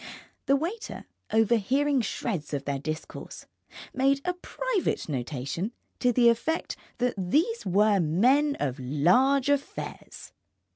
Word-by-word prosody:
The 275 - +5
waiter, 360 +11 -4 0.3
overhearing 240 +6 +2
shreds 175 -10 -3
of 140 -1 -4
their 140 -1 -2
discourse, 155 +2 -6 0.5
made 275 +1 +2
a 360 - +1
private 430 +3 -2
notation 140 - -3 0.3
to 250 - +3
the 240 0 +4
effect 310 +8 -1 0.2
that 250 0 +1
these 320 - 0
were 205 +2 +4
Men 250 - +3
of 135 -1 -2
Large 185 - +3
Affairs. 285 0 -4
235 Hz, 115 wpm, -27 LUFS, -, 0.5 s, The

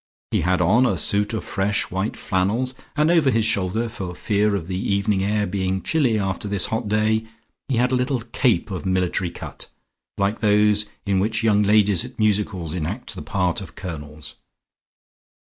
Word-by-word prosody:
He - - +1
had 90 +2 +1
on 120 +9 +4
a - - 0
suit 105 +1 +2
of 110 - -3
fresh 100 +1 -1
white 95 +4 -2
flannels 105 +8 0 0.2
and 155 +2 +3
over 165 -5 +4
his 115 -3 +2
shoulders, 110 +3 0
for 90 -5 -6
fear 105 +1 +1
of 95 - -3
the 90 +1 -4 0.2
evening 100 -1 +1
air 105 +1 +1
being 95 0 -2
chilly 135 -9 +2
after 95 0 -2
this 100 -2 +1
hot 110 0 -2
day, 110 +1 +1 0.4
he 130 - +1
had 125 +2 +2
a - - +3
little 125 0 0
cape 115 -4 0
of 95 - -3
a - - -6
military 90 0 0
cut, - - -9 0.5
like 100 +3 0
those 105 -1 +3 0.2
in 100 -2 +1
which 110 +3 0
young 105 -2 +4
ladies 105 -3 +3
at - - -10
music 105 -1 +2
halls 85 -5 -5
enact 90 +8 -4
the - - -7
part 90 +4 -1
of 95 - -10
colonels. 75 -4 -7
105 Hz, 185 wpm, -22 LUFS, 95-110 Hz, 0.5 s, on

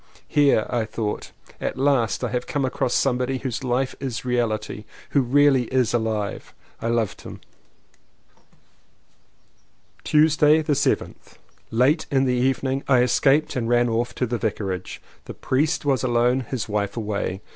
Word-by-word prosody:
"Here," 140 -7 +3
I 120 -2 -1
thought, 110 -1 -4 0.3
"at - - -3
last, 135 -4 +1
have - - -2
I - - +2
come 140 -2 0
across 130 -1 -1
somebody 130 0 +1
whose 130 -3 -4
Hfe 130 0 -1
is 130 -4 -4
a - - -20
reahty 110 -4 -2
— - - -21
who 140 - +3
is 125 - -4
really 140 -3 +4 0.2
alive!" 110 -3 -2 0.3
I - - -2
loved 115 -3 -1
him. - - -10 2.6
Tuesday 155 0 +4
the 150 - +1
7th. - - -2 0.3
Late 130 +8 +2
in 135 -1 +2
the 125 - +1
evening 130 +2 0
I 130 -3 +4
escaped 135 +4 +2
and 120 -3 -2
ran 120 0 +3
off 115 +2 -1
to 125 - 0
the 120 0 -3
Vicarage. 100 -4 -4 0.2
The - - -8
priest 150 +4 0
was 135 -3 +2
alone, 120 +1 +2
his 125 -5 -3
wife 105 0 -2
away. 105 -3 -3
125 Hz, 155 wpm, -23 LUFS, 115-135 Hz, 2.6 s, really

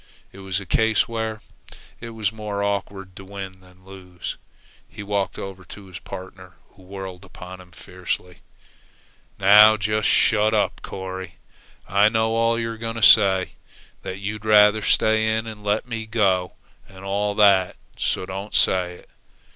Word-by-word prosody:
It 95 - -14
was 95 -1 -3
a 100 - -9
case 110 +4 +2
where 110 -2 -4 0.6
it 115 - -8
was 110 -3 -2
more 105 -2 -4
awkward 100 -2 -4
to 95 - -9
win 95 -1 -9
than 90 0 -21
lose. 90 -2 -8 0.5
He - - -9
walked 100 -1 -2
over 95 -1 -8
to 100 +3 -12
his 90 -2 -10
partner, 95 -1 -10 0.2
who - - -22
whirled 95 -1 -9
upon 90 0 -11
him 90 - -17
fiercely: 90 0 -6 1.0
"Now 105 +2 +7
you - - -2
just 105 0 0
shut 110 0 +3
up, - - 0
Corry! 95 -1 -7 0.5
I 100 +2 +4
know 110 0 0
all 115 0 +1
you're 115 0 -3
going 115 0 -4
to 115 - -5
say 95 -4 +5 0.5
that 95 - -6
you'd 105 +1 -5
rather 105 0 +5
stay 110 +1 +2
in 110 - -3
and 110 -2 -9
let 105 +3 -1
me 115 -2 -5
go, 95 -5 +1 0.4
and 95 0 -13
all 100 +1 -1
that; 100 -3 +4 0.2
so - - -2
don't 95 +2 -6
say 90 -1 +3
it. - - -18
100 Hz, 165 wpm, -22 LUFS, 95-110 Hz, 1.0 s, Now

